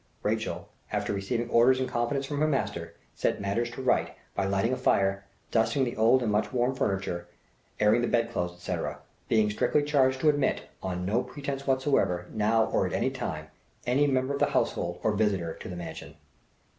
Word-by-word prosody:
Rachel, - - -2 0.2
after - - -1
receiving 115 +4 -2
orders 130 +3 +5
in 130 - +1
confidence 130 +3 -1
from 145 +1 -3
her 155 - +3
master, 140 -3 -2 0.2
set - - 0
matters 100 +4 -1
to 120 +2 -7
right 130 - +1 0.2
by 100 - 0
lighting 100 +5 +1
a - - +2
fire, 95 -6 +1 0.3
dusting 115 +4 +2
the 120 -2 -2
old 115 +4 +4
and 110 - 0
much 105 0 +1
worn 125 +1 +1
furniture, 95 -8 -2 0.5
airing 105 +3 +4
the 120 - +1
bed 115 0 +1
clothes, 90 -6 -2
etc., 90 0 -4 0.3
being 110 -2 +3
strictly 145 +7 +2
charged 135 -3 +2
to 155 - +5
admit, 145 -2 +1 0.2
on 90 -1 -3
no 110 +6 +2
pretence 140 +2 -5
whatever, 130 -10 +1
now 110 +1 +3
or 95 - +1
at - - -5
any 130 - +1
time, 80 - -5 0.4
any 135 +4 +3
member 130 0 +1
of 140 - -2
the - - +4
household 85 0 -1
or 110 - +3
visitor 100 -6 0
to - - -9
the 90 - -5
mansion. 85 -2 -8
115 Hz, 190 wpm, -28 LUFS, 100-130 Hz, 0.5 s, orders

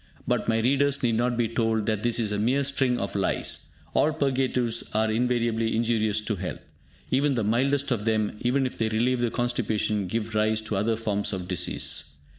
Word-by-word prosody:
But - - 0
my 115 0 +2
readers 140 +3 +2
need 120 -2 +2
not 120 +1 +1
be 120 -2 +2
told 110 -1 0
that 110 -2 0
this 120 0 +2
is 110 -3 0
a 105 - -1
mere 130 +6 +2
string 135 -2 +1
of 100 -4 -3
lies. 100 -2 -2 0.2
All 155 - +3
purgatives 130 -5 0
are 110 0 +2
invariably 115 -1 +1
injurious 110 -2 +1
to 105 -1 -2
health. 90 +1 -4 0.5
Even 140 +1 +2
the 115 - 0
mildest 135 +6 +1
of 110 -4 0
them, 110 -2 +1
even 130 +2 +2
if 130 - -5
they 110 -1 +1
relieve 120 +3 +1
the 120 -1 +1
constipation, 110 -4 -1
give 110 +3 -3
rise 110 0 +2
to 110 -1 -3
other 110 +4 +1
forms 105 -2 -2
of 90 -2 -4
disease. 90 -4 -2
115 Hz, 195 wpm, -26 LUFS, 110-125 Hz, 0.5 s, All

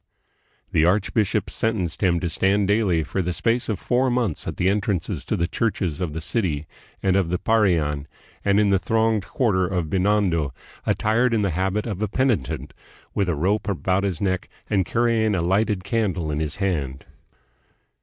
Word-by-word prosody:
The 80 - +3
archbishop 100 +3 +1
sentenced 100 -7 -1
him 90 -3 +3
to 90 - -1
stand 95 +4 +2
daily 100 -6 +2
for 95 - -2
the 90 0 -2
space 115 +10 0
of 105 - 0
four 130 +1 +1
months 120 -9 -1
at - - -4
the 90 - +1
entrances 100 -3 -1
to - - -1
the 85 - +1
churches 95 -6 -1
of 85 -4 -2
the 80 - -4
city 80 -6 -1 0.4
and 95 -1 +3
of 95 -4 +2
the 90 - 0
Parian, 85 -10 +1 0.4
and 100 +1 +3
in 105 -1 +3
the 95 - +4
thronged 110 +1 +1
quarter 95 -8 +1
of 85 -4 -2
Binondo, 90 -8 +1 0.3
attired 115 +3 +2
in 105 - +1
the 100 - +1
habit 95 +5 -1
of 105 -4 -4
a 110 - +1
penitent, 80 - -1 0.4
with 100 -3 0
a 85 - +1
rope 100 +7 0
about 95 0 0
his 95 -5 -1
neck 95 +1 -1 0.2
and 95 -3 +2
carrying 115 -3 +2
a 90 - 0
lighted 95 +2 +1
candle 95 -7 -1
in 75 - -1
his 75 -1 -2
hand. 75 -10 -2
95 Hz, 180 wpm, -23 LUFS, 85-105 Hz, 0.4 s, the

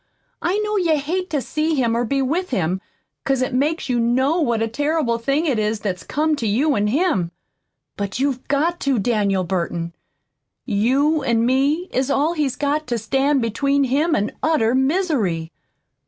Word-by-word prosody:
I 365 +4 0
know 425 0 -1
you 335 -5 +2
hate 350 +6 -2
to 290 -4 -1
see 310 +1 -1
him 235 -4 +1
or 235 - +1
be 275 +3 0
with 345 +8 -1
him, 185 -5 -1 0.4
'cause 270 -2 +1
it 255 - -3
makes 295 +6 0
you 245 -2 0
KNOW 260 +8 +2
what 235 -6 +1
a - - 0
terrible 290 -1 0
thing 275 +7 0
it 265 -8 +1
is 215 0 0
that's 190 -4 -3
come 310 +1 0
to 230 - -2
you 275 +9 +2
an' 205 0 +1
him. 250 - +1 0.7
But 200 0 -3
you've 265 -1 -1
got 330 +5 +1
to, 275 -3 +1
Daniel 200 -3 +1
Burton. 170 -1 -3 0.7
You 270 +8 +2
an' 235 -3 +2
me 280 +8 +1
is 260 +1 0
all 295 +4 +2
he's 295 -6 -1
got 295 +2 -1
to 240 -1 -1
stand 270 +4 +1
between 275 +5 +1
him 295 +6 +1
an' 205 - 0
utter 295 -8 +2
misery. 260 - 0
270 Hz, 180 wpm, -21 LUFS, 225-305 Hz, 0.7 s, you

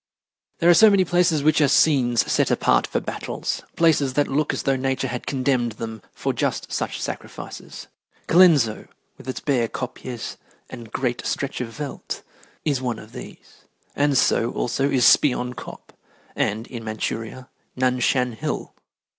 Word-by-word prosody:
There 170 - +1
are 175 - +8
so 220 +5 +7
many 195 -2 +4
places 175 -4 +2
which 155 +1 +4
are 145 - +5
scenes 130 -5 +3
set - - +1
apart - - +2
for - - -1
battles - - -4
places 150 -5 +3
that 145 +1 +2
look 150 +2 0
as - - -3
though 135 - +2
Nature 135 0 -1
had 125 0 -5
condemned 130 -4 0
them 110 0 -7
for - - -2
just - - -2
such - - -2
sacrifices. - - -7 0.4
Colenso, 160 -11 +4 0.3
with 130 - -9
its 130 - -4
bare 125 -5 +1
kopjes 125 -1 -6 0.3
and 115 -2 -9
great 125 -2 -2
stretch 140 -2 -2
of 125 - -3
veldt, 145 -2 -6 0.4
is 140 -4 0
one 120 -3 -2
of 110 +1 -12
these, 125 0 -12 0.3
and 145 -1 +2
so, 120 -1 +2
also, 135 +3 0
is 130 -3 +3
Spion 125 -3 +4
Kop, - - -10 0.4
and, 110 +3 -1
in 120 -2 -8
Manchuria, 110 +3 -4 0.3
Nan 125 0 +1
Shan 125 0 +2
Hill. 110 - -4
130 Hz, 160 wpm, -23 LUFS, 120-145 Hz, 0.4 s, are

